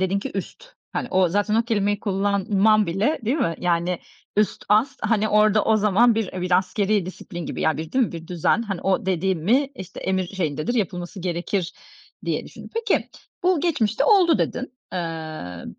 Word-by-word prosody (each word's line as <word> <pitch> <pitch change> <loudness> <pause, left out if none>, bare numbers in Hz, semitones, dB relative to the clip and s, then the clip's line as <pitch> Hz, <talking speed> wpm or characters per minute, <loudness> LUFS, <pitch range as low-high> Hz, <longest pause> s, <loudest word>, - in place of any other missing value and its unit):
dedin 190 +1 +1
ki - - -5
"üst," 195 - -6 0.3
hani, - - -2
o 185 -2 +3
zaten 205 +3 0
o 230 - +4
kelimeyi 205 -3 0
kullanman 200 +1 +2
bile, 195 - 0
değil 250 +7 +1
mi? 235 - 0
Yani 175 0 0 0.4
üst, 210 0 +1
ast, 215 +6 +3
hani, 215 -2 +2
orada 210 0 +4
o 220 - +4
zaman 215 +3 +4
bir, 220 -3 -2
e, 185 - -5
bir 180 0 +3
askerî 195 0 0
disiplin 175 -2 -7
gibi, - - -5
ya, 160 - +2
bir, 160 0 -6
değil 260 -1 +4
mi? - - -6
Bir 165 -1 -7
düzen, 180 +6 +1
hani, 195 -5 -4
o, 195 +2 0
dedi 190 +1 +1
mi, 240 - +2
işte, 190 -6 -9
emir 190 -1 0
şeyindedir, 165 - -2
yapılması 185 -3 -3
gerekir 175 +1 -2 0.5
diye - - -1
düşündün. - - -12
Peki, 460 -2 0 0.3
"Bu 360 -3 +3
geçmişte 280 -11 +1
oldu." 380 -7 +5
dedin. 260 0 -2 0.2
Eee, 160 - -5
195 Hz, 180 wpm, -23 LUFS, 180-220 Hz, 0.5 s, oldu